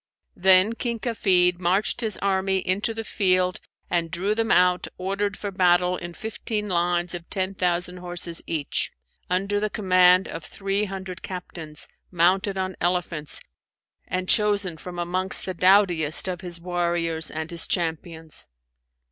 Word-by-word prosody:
Then 190 +2 +5
King 235 0 -3
Kafid 185 -6 +2
marched 190 +7 0
his 220 -2 0
army 190 -1 +1
into 190 +4 0
the 225 0 -4
field 185 -4 +1 0.3
and 170 -1 -1
drew 185 +5 -1
them 225 +1 -1
out 180 0 +3
ordered 200 +2 -2
for 205 - -5
battle 180 -1 +3
in 175 -1 -8
fifteen 215 0 -4
lines 175 -1 0
of 175 -1 -7
ten 190 0 -2
thousand 180 -1 -1
horses 175 -1 +1
each, 155 -4 -2 0.4
under 195 +3 0
the 215 +1 -1
command 185 -2 +4
of 165 - -7
three 200 +1 -2
hundred 190 -2 -7
captains, 165 -4 -7 0.2
mounted 190 +3 +1
on 185 -1 -3
elephants 175 -4 0 0.7
and 185 0 -3
chosen 205 -5 +3
from 175 +3 -9
amongst 180 +2 +3
the 185 - -3
doughtiest 180 -4 +4
of 180 -1 -4
his 175 -2 -7
warriors 170 -2 0
and 160 +1 -6
his 170 -1 +3
champions. 165 -2 -3
180 Hz, 145 wpm, -24 LUFS, 175-195 Hz, 0.7 s, Then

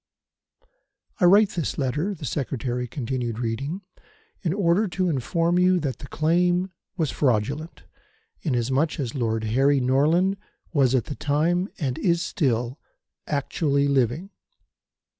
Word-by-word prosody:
"I 180 - +4
write 200 +3 +6
this 170 -6 -3
letter," 150 +9 -1
the 150 - -8
Secretary 125 -2 -2
continued 120 -2 -3
reading, 125 - -3 0.6
"in 170 - 0
order 195 +2 +2
to 185 0 -1
inform 165 +6 +1
you 180 0 +4
that 140 -6 -3
the 140 - -9
claim 175 +4 +1 0.3
was 160 -5 0
fraudulent, 140 +6 -1 0.6
inasmuch 135 +2 0
as 125 -5 -2
Lord 115 -4 -1
Harry 135 +6 +3
Norland 155 +10 +2 0.4
was 135 -4 +3
at 125 - +1
the - - -5
time, 165 +7 0
and 130 -5 -2
is 170 -1 +2
still, 125 - -1 0.5
actually 140 0 0
living." 140 - 0
145 Hz, 125 wpm, -24 LUFS, 130-175 Hz, 0.6 s, write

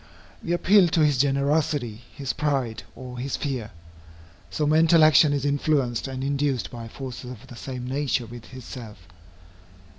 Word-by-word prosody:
We 170 - -3
appeal 190 +2 +5
to 160 -1 +3
his 145 -4 +2
generosity, 140 -4 +1
his 135 -2 -3
pride, 135 -7 -1
or 125 -1 -8
his 135 +2 -2
fear. 130 -7 -3 0.8
So 150 - -1
mental 160 +2 +5
action 155 -1 +6
is 145 -1 -1
influenced 140 -4 +1
and 130 0 -5
induced 140 -2 -1
by 115 -1 -7
forces 125 +1 -7
of 125 -1 -10
the 130 -2 -12
same 125 0 -6
nature 135 -2 0
with 115 0 -11
itself. 120 -4 -9
135 Hz, 150 wpm, -25 LUFS, 125-145 Hz, 0.8 s, action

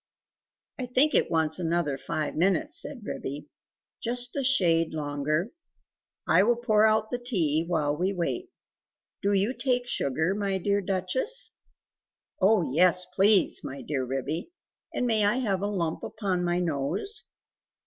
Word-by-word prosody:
"I 255 - -3
think 265 +5 +3
it - - +2
wants 160 0 +1
another 170 -4 0
five 150 +3 -3
minutes," 295 - +1
said 265 -6 -6
Ribby. 145 -3 -5 0.6
"Just 245 +1 -2
a 280 - 0
shade 170 -12 +3
longer; 150 - -1 0.8
I - - +5
will 235 +4 +3
pour 220 -2 +3
out 215 0 +1
the 245 - -2
tea, 170 - +1
while 150 -4 0
we 180 +5 0
wait. 200 - -3 0.7
Do 200 - +1
you 200 +5 +2
take 250 -2 0
sugar, 160 - 0
my 200 -1 -1
dear 200 +2 0
Duchess?" 195 - -1 0.9
"Oh 195 0 +4
yes, 180 +3 +4
please! 200 +1 +4
my 135 +1 -7
dear 140 -3 -2
Ribby; 135 - -3 0.4
and 250 - -1
may 220 -3 +2
I 205 +3 +3
have 205 -7 -1
a 205 - 0
lump 170 -6 -2
upon 195 -5 -2
my 175 0 0
nose?" 170 - -2
190 Hz, 150 wpm, -27 LUFS, 160-235 Hz, 0.9 s, I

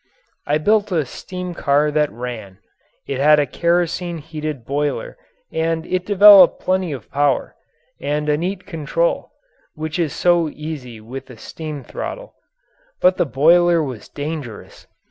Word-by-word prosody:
I 150 - +2
built 205 +5 +2
a 160 -5 +1
steam 180 +7 -7
car 145 -1 +1
that 150 0 +1
ran. 115 -5 -7 0.5
It 135 - -4
had 150 +2 +5
a 145 - +2
kerosene 170 +3 0
heated 155 -4 -6
boiler 145 - -2 0.4
and 165 0 -1
it 185 0 -2
developed 205 -1 +8
plenty 185 -2 0
of 130 -7 -8
power 145 -2 0 0.4
and 150 +1 -2
a 150 - +3
neat 180 +5 -3
control 195 - -1 0.5
which 155 +2 -4
is 160 -4 0
so 175 -2 +2
easy 145 -7 -7
with 125 +6 -9
a 125 - -12
steam 150 +2 -7
throttle. - - -7 0.7
But 185 0 +4
the - - +1
boiler 170 +4 +4
was 130 -7 -7
dangerous. 145 -6 -7
155 Hz, 145 wpm, -20 LUFS, 140-175 Hz, 0.7 s, developed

